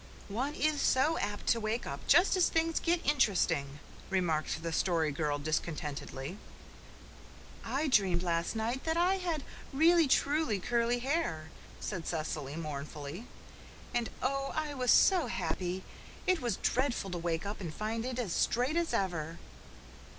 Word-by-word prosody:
"One 260 +9 -2
is 305 -2 +1
so 300 +5 +3
apt 205 0 -3
to 235 - +4
wake 220 +2 -2
up 140 0 -4
just 355 +3 +6
as 365 -2 +4
things 330 0 +1
get 340 0 0
interesting," 180 - +2 0.3
remarked 165 -4 0
the 165 -1 -2
Story 165 -3 +1
Girl 145 0 -1
discontentedly. 150 +1 -3 1.2
"I 270 +7 -1
dreamed 190 -9 +3
last 170 +3 0
night 230 +4 -2
that 320 0 +1
I 365 +3 +3
had 335 -5 -2 0.3
really 325 +3 +5
truly 280 -5 +2
curly 235 +4 +1
hair," 240 - -1 0.3
said 180 -5 -4
Cecily 155 -3 -3
mournfully. 150 +4 -6 0.7
"And 240 -2 0
oh, 275 +1 0
I 310 -2 -1
was 255 -3 -1
so 370 -4 +6
happy! 185 +1 -2 0.4
It 370 -5 +2
was 235 -6 -1
dreadful 250 -7 0
to 175 - -3
wake 165 +1 -2
up 205 +1 -5
and 170 -4 -4
find 220 +6 -3
it 255 0 -3
as 220 -9 -2
straight 255 +7 +1
as 340 -1 +1
ever." 170 -4 -2
220 Hz, 150 wpm, -32 LUFS, -, 1.2 s, just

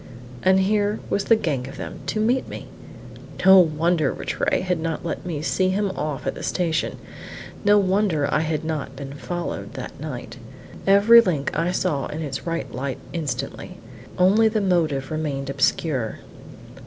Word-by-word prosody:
And 190 0 +4
here 205 +2 +1
was 200 - 0
the 225 - +5
gang 140 - -2
of 135 - -9
them, - - -7
to 215 - -1
meet 240 +4 +1
me! - - -7 0.8
No 190 0 +9
wonder 160 -2 +2
Rattray - - -1
had 180 -2 -1
not 165 +1 -3
let 170 +2 -4
me 155 -4 -3
see 185 +3 +1
him 200 +1 0
off 150 -6 -4
at - - -1
the - - -9
station; 165 -3 -1 0.7
no 205 0 +5
wonder 190 -6 +2
I 150 - +3
had 155 -1 -2
not 155 -4 -3
been 140 0 -7
followed 175 +4 -5
that - - -7
night. - - -7 0.5
Every 205 +4 +8
link 165 -10 -1
I 170 +3 +1
saw 140 -6 -1
in 155 +2 -5
its 140 +2 -5
right 165 0 -3
light 130 +1 -3 0.2
instantly. 140 -6 -4 0.4
Only 200 +5 +5
the 220 0 +1
motive 160 -9 0
remained 140 -3 -2
obscure. 135 -3 0
165 Hz, 165 wpm, -23 LUFS, 145-190 Hz, 0.8 s, No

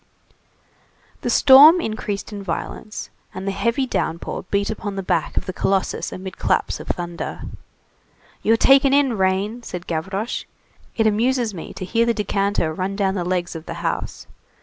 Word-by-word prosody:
'" - - -35
The - - -2
storm 290 +6 +8
increased 215 - -4
in 205 - -6
violence, 195 +3 -5 0.2
and 190 +1 -5
the - - +1
heavy 235 +6 0
downpour 170 -8 -3
beat 200 +1 0
upon 205 -2 -5
the 195 - -3
back 170 -3 -1
of - - 0
the 185 - -4
colossus 195 +1 -1
amid 185 0 -8
claps - - 0
of - - -9
thunder. 175 -1 -4 1.0
"You're 225 +1 +3
taken 270 +2 +5
in, 280 -4 +3
rain!" 195 +4 0
said 180 -6 -7
Gavroche. 190 +7 -3 0.5
"It 225 - +2
amuses 230 +1 +1
me 170 - -7
to 185 - -5
hear 230 +5 +1
the 235 - +2
decanter 200 -5 0
run 190 +3 -3
down 195 -1 +1
the 185 -3 -2
legs 180 -1 -2
of 160 0 -8
the - - -5
house. - - -3
200 Hz, 170 wpm, -21 LUFS, 185-230 Hz, 1.0 s, storm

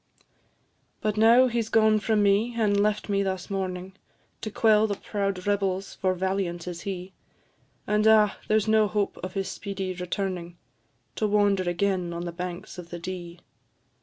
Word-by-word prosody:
But 215 -1 -1
now 230 +4 +6
he 240 -2 0
's 220 - -6
gone 220 -1 +4
from 210 0 +1
me, 205 +4 +2
and 205 -3 +2
left 210 0 0
me 200 -1 +1
thus 190 -1 -3
mourning, 190 -1 -3 0.5
To 215 - -3
quell 215 0 +4
the 205 - -2
proud 195 -3 -3
rebels 195 -1 -1
for 185 -1 0
valiant 185 -2 -2
is 175 -1 -5
he; 190 -2 -6 0.7
And, 210 +1 +2
ah! 215 -2 +5
there's 215 -1 +2
no 215 -1 +4
hope 200 +1 -1
of 185 0 -6
his 195 -1 -1
speedy 195 -2 -4
returning, 180 -1 -4 0.6
To 215 - +1
wander 200 -3 +2
again 180 -1 0
on 170 +1 -4
the 175 - -4
banks 180 +1 -6
of 170 -1 -9
the 175 - -6
Dee. 175 -1 -7
195 Hz, 165 wpm, -26 LUFS, 180-210 Hz, 0.7 s, now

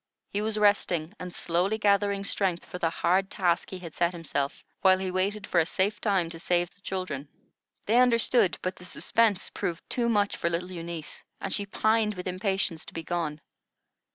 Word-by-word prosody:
He 205 - -1
was 215 0 -1
resting 200 -5 +2
and 180 -1 -7
slowly 180 +5 +1
gathering 200 -1 +2
strength 185 -4 0
for 180 - -7
the 165 - +2
hard 185 +4 +1
task 175 -4 +1
he 190 - -5
had 170 -4 -9
set 170 +2 +1
himself, 145 -4 -3 0.2
while 190 -1 +6
he 190 -1 -3
waited 195 +3 -1
for 175 - +2
a 160 - +4
safe 195 +3 0
time 195 -5 +2
to 165 - -8
save 175 -1 +1
the 200 - -28
children. 155 -8 -4 0.6
They 225 +3 +3
understood, 235 -4 +4
but 185 0 -2
the 180 - -11
suspense 210 +2 +1
proved 170 0 -4
too 235 -2 +1
much 205 -3 +2
for 170 - 0
little 175 +2 -2
Eunice, 170 -3 -6 0.2
and 195 - -2
she 200 -1 -1
pined 215 +1 +2
with 180 - -6
impatience 190 -2 -1
to - - -11
be 165 - -4
gone. 155 -3 -2
185 Hz, 190 wpm, -28 LUFS, 170-205 Hz, 0.6 s, while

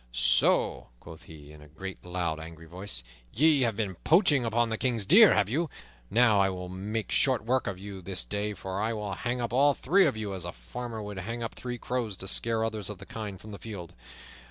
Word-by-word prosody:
"So," - - +3
quoth 80 -1 -12
he, 75 -2 -12
in 75 0 -14
a 75 - -13
great, 95 +6 -8
loud, 90 -3 -2
angry 80 0 -10
voice, 90 -6 -4 0.3
"ye 150 +2 +4
have 115 -4 +2
been 105 -3 -2
poaching 155 - +4
upon 115 0 +1
the 110 - -2
King's 120 -5 0
deer, 205 - +8
have 100 - +3
you? 155 +9 -1 0.4
Now 115 -2 +4
I 95 - +3
will 90 -1 -5
make 100 +3 -4
short 130 -5 +2
work 130 +2 +1
of 100 - -3
you 95 0 -8
this 90 +1 -3
day, 105 0 -2
for 95 +1 -4
I 110 +2 0
will 105 -2 -4
hang 120 +6 -2
up 120 -1 -3
all 140 +2 +4
three 185 +6 +4
of 135 - -1
you 105 -2 -3
as 95 -3 -4
a 85 - -3
farmer 110 - -7
would 105 -2 -6
hang 115 +5 -4
up 115 - -4
three 125 -1 -5
crows 120 -6 -3
to 95 - -7
scare 110 +3 0
others 110 -3 -2
of 105 - -6
the 95 - -11
kind 105 -3 -6
from 110 - -11
the 100 - -8
field. 90 -4 -8
105 Hz, 225 wpm, -28 LUFS, 95-120 Hz, 0.4 s, deer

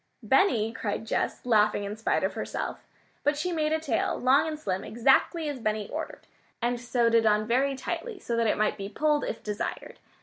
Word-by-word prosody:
"Benny!" 230 - +3
cried 220 -1 -3
Jess, 225 - -2
laughing 210 -3 +3
in 200 +1 -4
spite 220 - 0
of - - 0
herself. - - -5 0.4
But 290 0 +2
she 360 +4 -1
made 310 -2 0
a 315 - +2
tail, 315 -3 -1
long 270 +5 +4
and 310 -1 -3
slim, 190 -8 -2
exactly 270 - +2
as 285 -3 -4
Benny 215 -2 -1
ordered, - - -6 0.3
and 240 0 0
sewed 240 -1 +1
it 225 -1 +4
on 210 0 +3
very 265 +4 +1
tightly, 430 - -4
so 235 -10 -3
that 230 -1 +2
it - - +1
might 215 0 +1
be 195 -1 -5
"pulled" 300 +5 +1
if 225 - -4
desired. 210 -1 -4
235 Hz, 200 wpm, -27 LUFS, 215-295 Hz, 0.4 s, long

